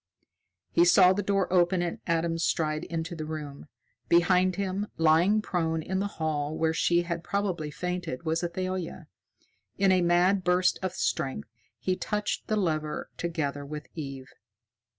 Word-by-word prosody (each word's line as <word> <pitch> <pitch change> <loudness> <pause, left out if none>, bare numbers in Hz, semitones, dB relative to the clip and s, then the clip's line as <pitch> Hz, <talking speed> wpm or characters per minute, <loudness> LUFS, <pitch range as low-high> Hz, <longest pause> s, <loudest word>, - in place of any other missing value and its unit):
He 340 - +5
saw 195 - +6
the 205 - -1
door 195 -2 0
open 175 0 +3
and 170 - -3
Adam 165 0 0
stride 155 -1 0
into 165 0 -4
the 155 - -5
room. 150 -2 -7 0.4
Behind 180 +2 +4
him, 200 +1 -2
lying 170 +7 +4
prone 165 -4 -1
in 190 +3 -2
the 200 - 0
hall 155 -1 -1
where 160 0 +1
she 175 +1 +2
had 170 -1 -4
probably 180 -5 -2
fainted, 180 -3 -4
was 160 +1 0
Athalia. 185 0 -3 0.7
In 195 -1 +4
a 185 -1 +4
mad 175 +3 +3
burst 180 +1 +2
of 185 -1 -2
strength 135 - -2 0.3
he 185 - -1
touched 210 +2 -2
the 215 - +1
lever 155 -6 -2
together 150 -4 -3
with 150 +1 -7
Eve. 135 -4 -7
175 Hz, 150 wpm, -28 LUFS, 160-185 Hz, 0.7 s, saw